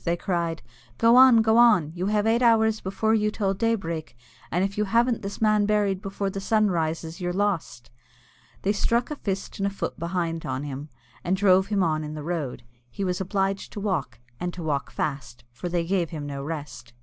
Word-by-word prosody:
they 170 Hz, 0 st, 0 dB
all -, -, -20 dB
cried; 170 Hz, -3 st, -1 dB, 0.3 s
"go 230 Hz, +1 st, +5 dB
on, 250 Hz, -3 st, +8 dB
go 220 Hz, +1 st, +3 dB
on, 210 Hz, -11 st, +5 dB
you 180 Hz, +2 st, -2 dB
have 210 Hz, 0 st, +1 dB
eight 230 Hz, +2 st, +2 dB
hours 220 Hz, -2 st, +4 dB
before 220 Hz, +3 st, 0 dB
you 210 Hz, -1 st, +2 dB
till 200 Hz, -2 st, -1 dB
daybreak, 170 Hz, -, -2 dB, 0.3 s
and 180 Hz, +2 st, +1 dB
if 195 Hz, 0 st, -2 dB
you 210 Hz, -, 0 dB
haven't 235 Hz, +3 st, +2 dB
this 200 Hz, 0 st, -6 dB
man 215 Hz, -2 st, +3 dB
buried 205 Hz, -3 st, +1 dB
before 195 Hz, 0 st, -3 dB
the 195 Hz, -, -4 dB
sun 215 Hz, 0 st, +2 dB
rises, 165 Hz, +1 st, -2 dB
you're 175 Hz, 0 st, -1 dB
lost." 175 Hz, -, -2 dB, 0.7 s
They 195 Hz, -, +2 dB
struck 235 Hz, +5 st, 0 dB
a -, -, -2 dB
fist 195 Hz, -8 st, -4 dB
and 195 Hz, -, +1 dB
a -, -, +1 dB
foot 200 Hz, -, -5 dB
behind 170 Hz, -1 st, -2 dB
on 130 Hz, +1 st, -3 dB
him, 145 Hz, +1 st, -6 dB, 0.3 s
and 185 Hz, +2 st, 0 dB
drove 190 Hz, -1 st, +4 dB
him 200 Hz, -2 st, +1 dB
on 155 Hz, -2 st, 0 dB
in 150 Hz, 0 st, -6 dB
the 150 Hz, -, -6 dB
road. 155 Hz, -7 st, -3 dB, 0.3 s
He 195 Hz, -, -5 dB
was 180 Hz, 0 st, -1 dB
obliged 195 Hz, +1 st, -1 dB
to -, -, -5 dB
walk, 170 Hz, -, -2 dB, 0.2 s
and 180 Hz, 0 st, -2 dB
to 175 Hz, -, -6 dB
walk 145 Hz, -3 st, -1 dB
fast, 135 Hz, -4 st, -4 dB
for 120 Hz, +9 st, -6 dB
they 170 Hz, -1 st, 0 dB
gave 175 Hz, -2 st, 0 dB
him 150 Hz, -3 st, -6 dB
no 140 Hz, -1 st, -5 dB
rest. 145 Hz, -6 st, -7 dB
190 Hz, 210 wpm, -25 LUFS, 160-210 Hz, 0.7 s, on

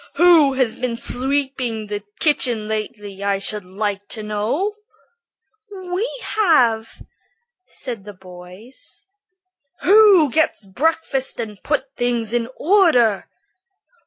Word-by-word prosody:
Who 335 Hz, -6 st, +5 dB
has 260 Hz, -4 st, 0 dB
been 250 Hz, -2 st, -2 dB
sweeping 260 Hz, -3 st, -2 dB
the 205 Hz, 0 st, -5 dB, 0.2 s
kitchen 245 Hz, -8 st, +1 dB
lately, 210 Hz, -2 st, -5 dB
I 200 Hz, -1 st, +1 dB
should 205 Hz, +1 st, -2 dB
like 200 Hz, +2 st, -4 dB
to 220 Hz, -, -5 dB
know?" 215 Hz, -, -2 dB, 1.0 s
"We 375 Hz, +3 st, -3 dB
have," 245 Hz, -, +1 dB, 0.6 s
said 235 Hz, -6 st, -5 dB
the 205 Hz, 0 st, -11 dB
boys. 185 Hz, -, -13 dB, 0.8 s
"Who 395 Hz, -, +6 dB
gets 315 Hz, -8 st, 0 dB
breakfast 270 Hz, +5 st, -1 dB
and 215 Hz, -3 st, -6 dB
puts 295 Hz, -3 st, -1 dB
things 240 Hz, -2 st, -1 dB
in 240 Hz, 0 st, -1 dB
order?" 305 Hz, -, +3 dB
240 Hz, 105 wpm, -20 LUFS, 210-305 Hz, 1.0 s, Who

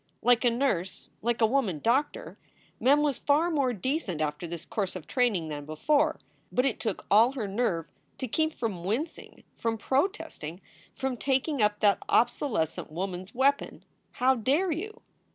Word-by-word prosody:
Like 245 Hz, +1 st, +4 dB
a 245 Hz, -, +5 dB
nurse, 230 Hz, -8 st, -1 dB
like 235 Hz, +1 st, 0 dB
a -, -, +7 dB
woman 220 Hz, -, +1 dB
doctor, 255 Hz, -, 0 dB, 0.4 s
Mem 285 Hz, +3 st, +4 dB
was 285 Hz, -4 st, 0 dB
far 310 Hz, +4 st, +2 dB
more 280 Hz, -5 st, +2 dB
decent 240 Hz, -, -2 dB
after 155 Hz, +2 st, -2 dB
this 170 Hz, 0 st, -7 dB
course 195 Hz, -4 st, -3 dB
of 185 Hz, -, -7 dB
training 215 Hz, -11 st, +1 dB
than 145 Hz, -1 st, -5 dB
before. 285 Hz, -, +1 dB, 0.3 s
But 250 Hz, -, +2 dB
it 270 Hz, -, 0 dB
took 220 Hz, -4 st, -3 dB
all 225 Hz, +6 st, +6 dB
her 235 Hz, -7 st, -3 dB
nerve 195 Hz, -6 st, 0 dB, 0.3 s
to 260 Hz, -, -3 dB
keep 315 Hz, +7 st, +1 dB
from 205 Hz, -8 st, -3 dB
wincing, 245 Hz, -, -4 dB
from 225 Hz, -1 st, -2 dB
protesting, 270 Hz, -, -2 dB, 0.4 s
from 265 Hz, -2 st, -2 dB
taking 270 Hz, +2 st, 0 dB
up 210 Hz, 0 st, +2 dB
that 205 Hz, -1 st, +4 dB
obsolescent 220 Hz, -, +1 dB
woman 180 Hz, +2 st, -3 dB
s 190 Hz, +6 st, -14 dB
weapon, 275 Hz, +3 st, +1 dB, 0.3 s
"How 260 Hz, +1 st, +3 dB
dare 275 Hz, -, +1 dB
you!" 425 Hz, +8 st, -5 dB
240 Hz, 165 wpm, -28 LUFS, 190-275 Hz, 0.4 s, a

